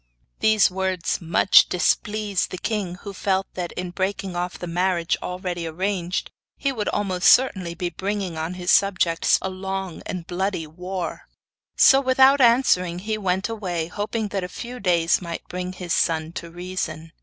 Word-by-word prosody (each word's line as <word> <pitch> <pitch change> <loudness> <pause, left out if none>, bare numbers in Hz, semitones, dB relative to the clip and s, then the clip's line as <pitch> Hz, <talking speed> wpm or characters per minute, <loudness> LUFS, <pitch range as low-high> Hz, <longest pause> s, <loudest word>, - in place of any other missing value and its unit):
These 215 -3 +4
words 185 -2 -1
much 170 +3 +5
displeased 205 +2 0
the - - -6
king, 195 -2 -2
who 200 - -6
felt 190 0 0
that, 175 -2 -4
in 180 -1 -5
breaking 190 0 -3
off 175 +1 -3
the - - -6
marriage 175 0 0
already 180 -2 -4
arranged 180 +2 -2 0.3
he 275 - 0
would 220 -5 -2
almost 190 -3 +2
certainly 190 -10 +2
be 175 0 -3
bringing 190 0 -3
on 160 +3 -4
his 180 0 0
subjects 180 -4 +3
a 190 - -1
long 190 -1 -5
and 180 -3 -5
bloody 185 -1 -2
war; 180 +3 -6 0.5
so, 270 0 +7
without 265 +1 +5
answering, 230 -8 +4
he 215 +4 -2
turned 190 -1 0
away, 180 -7 -3
hoping 210 +2 -3
that 195 -1 -2
a - - -3
few 245 +5 -7
days 170 -4 +2
might 170 -2 -6
bring 180 0 -4
his 180 -2 -4
son 160 -1 +1
to 170 0 -7
reason. 165 -2 -5
185 Hz, 165 wpm, -23 LUFS, 175-200 Hz, 0.5 s, so